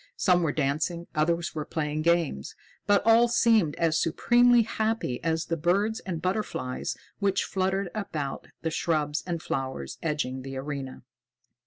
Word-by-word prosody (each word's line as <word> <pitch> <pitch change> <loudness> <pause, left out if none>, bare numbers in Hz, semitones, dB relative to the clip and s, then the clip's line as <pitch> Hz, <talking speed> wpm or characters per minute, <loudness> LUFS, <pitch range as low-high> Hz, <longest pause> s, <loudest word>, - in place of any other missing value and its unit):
Some 180 -2 +3
were 160 -3 +1
dancing, 155 +4 -1
others 170 +2 0
were 155 - -3
playing 150 0 -2
games, 165 - 0 0.3
but 205 -1 +4
all 230 +1 +6
seemed 225 -9 +3
as 165 -1 +1
supremely 240 +7 +4
happy 220 - -2
as 160 0 0
the 165 - -1
birds 195 +7 +1
and 175 -4 -4
butterflies 185 -8 -2 0.2
which 195 -1 +1
fluttered 190 -1 -1
about 155 -10 -4 0.2
the 160 - -1
shrubs 155 -2 0
and 170 -2 -3
flowers 130 - -4
edging 145 -5 -2
the 135 0 -6
arena. 135 -1 -5
165 Hz, 145 wpm, -27 LUFS, 150-195 Hz, 0.3 s, all